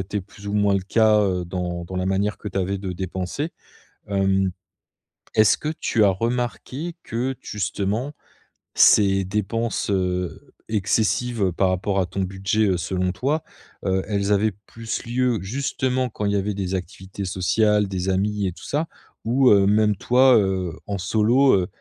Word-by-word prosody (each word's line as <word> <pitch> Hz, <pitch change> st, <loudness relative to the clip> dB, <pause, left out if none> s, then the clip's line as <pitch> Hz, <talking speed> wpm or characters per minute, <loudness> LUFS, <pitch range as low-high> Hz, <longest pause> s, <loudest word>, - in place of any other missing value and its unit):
été 100 Hz, +2 st, -3 dB
plus 100 Hz, +2 st, -14 dB
ou 100 Hz, -, -3 dB
moins 100 Hz, -1 st, +3 dB
le 95 Hz, -, +1 dB
cas, 110 Hz, +2 st, +4 dB
heu, 95 Hz, -3 st, 0 dB
dans 90 Hz, -1 st, -4 dB
dans 95 Hz, +2 st, -7 dB
la 90 Hz, 0 st, -1 dB
manière 100 Hz, +2 st, 0 dB
que 105 Hz, -, -6 dB
tu 95 Hz, 0 st, -3 dB
avais 95 Hz, +1 st, -1 dB
de 95 Hz, -2 st, -4 dB
dépenser. 95 Hz, -, -4 dB, 0.6 s
Hem, 95 Hz, -1 st, +1 dB, 0.8 s
est-ce 110 Hz, -1 st, +5 dB
que 150 Hz, -, -4 dB
tu 110 Hz, -, +1 dB
as 100 Hz, -, +6 dB
remarqué 125 Hz, -, -3 dB
que 125 Hz, +3 st, -2 dB
justement 105 Hz, +6 st, -2 dB, 0.6 s
ces 95 Hz, -2 st, +5 dB
dépenses, 105 Hz, +3 st, -2 dB
heu, 90 Hz, -2 st, -2 dB
excessives, 110 Hz, +2 st, 0 dB
heu, 95 Hz, -2 st, +2 dB
par 95 Hz, +2 st, +1 dB
rapport 95 Hz, +2 st, -1 dB
à 90 Hz, -, 0 dB
ton 95 Hz, +3 st, -5 dB
budget, 95 Hz, +3 st, 0 dB
heu, 95 Hz, -, +2 dB
selon 90 Hz, +2 st, -1 dB
toi, 145 Hz, +9 st, -1 dB, 0.4 s
heu, 95 Hz, 0 st, +1 dB
elles 100 Hz, -1 st, 0 dB
avaient 105 Hz, +1 st, +2 dB
plus 115 Hz, -1 st, -5 dB
lieu 125 Hz, -1 st, +1 dB
justement 130 Hz, +3 st, -1 dB
quand 105 Hz, -2 st, -5 dB
il 100 Hz, -, +1 dB
y 100 Hz, -, +1 dB
avait 100 Hz, +1 st, -1 dB
des 95 Hz, -1 st, -3 dB
activités 95 Hz, +2 st, -7 dB
sociales, 105 Hz, +3 st, +2 dB
des 95 Hz, -1 st, -3 dB
amis 100 Hz, +1 st, 0 dB
et 90 Hz, -, -2 dB
tout -, -, -15 dB
ça? 155 Hz, +3 st, -1 dB, 0.4 s
Ou, 125 Hz, +3 st, +4 dB
heu, 100 Hz, -1 st, +5 dB
même 105 Hz, 0 st, +3 dB
toi, 125 Hz, +3 st, +5 dB
heu, 95 Hz, -4 st, 0 dB
en 100 Hz, -1 st, -3 dB
solo, 115 Hz, +8 st, +3 dB
heu, 90 Hz, -, 0 dB
100 Hz, 175 wpm, -23 LUFS, 95-115 Hz, 0.8 s, as